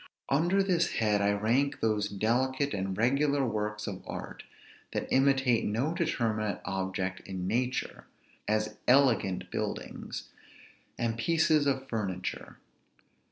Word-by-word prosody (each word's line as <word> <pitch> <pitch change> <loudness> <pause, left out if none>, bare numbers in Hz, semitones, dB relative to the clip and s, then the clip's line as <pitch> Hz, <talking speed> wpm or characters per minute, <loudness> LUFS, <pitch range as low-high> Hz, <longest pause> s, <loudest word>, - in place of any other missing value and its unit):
Under 175 +8 +3
this 175 -3 +1
head 105 -2 +2
I 100 0 +3
rank 115 +7 +1
those 105 -2 +1
delicate 130 +7 0
and 95 -1 -2
regular 140 +4 +2
works 105 -2 -2
of 95 -3 -5
art, - - -6 0.5
that - - -2
imitate 135 -3 +3
no 125 +10 0
determinate 115 - -1
object 95 -1 -2
in 95 -2 -4
nature, 125 +6 -1 0.4
as 110 0 0
elegant 125 -8 +3
buildings, - - -4 0.7
and 115 -1 -1
pieces 155 +2 +3
of 135 -1 0
furniture. 95 -6 -4
115 Hz, 115 wpm, -30 LUFS, 105-140 Hz, 0.7 s, Under